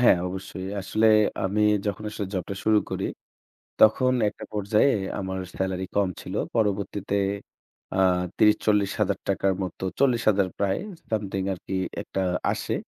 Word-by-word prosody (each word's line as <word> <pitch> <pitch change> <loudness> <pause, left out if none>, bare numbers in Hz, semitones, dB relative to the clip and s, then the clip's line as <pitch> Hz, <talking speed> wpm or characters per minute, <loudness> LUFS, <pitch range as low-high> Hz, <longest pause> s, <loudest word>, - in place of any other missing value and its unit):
হ্যাঁ, 120 - +6
অবশ্যই। 95 0 -6
আসলে 110 +3 +1 0.4
আমি 100 +3 +1 0.2
যখন 105 +1 -2
আসলে 105 -2 -4
জবটা 95 +2 -3
শুরু 110 -1 +5
করি, - - -2 0.8
তখন 125 +4 +5 0.2
একটা - - -8
পর্যায়ে 105 +5 +3 0.2
আমার 95 -1 -3 0.2
স্যালারি 95 0 -1
কম 100 -2 +3
ছিল। - - -7 0.2
পরবর্তীতে 100 -2 0 0.8
আ 95 - -1 0.4
৳৩০-৪০,০০০ 100 -2 +2
র - - -2
মতো 95 +1 -6 0.2
৪০,০০০ 110 -7 +3
প্রায় 100 -1 +1
something 185 -3 -10
সমথিং 100 -3 -1
আরকি 95 +1 -5 0.3
একটা 95 - -3 0.3
আসে। - - -3
100 Hz, 130 wpm, -26 LUFS, 95-110 Hz, 0.8 s, হ্যাঁ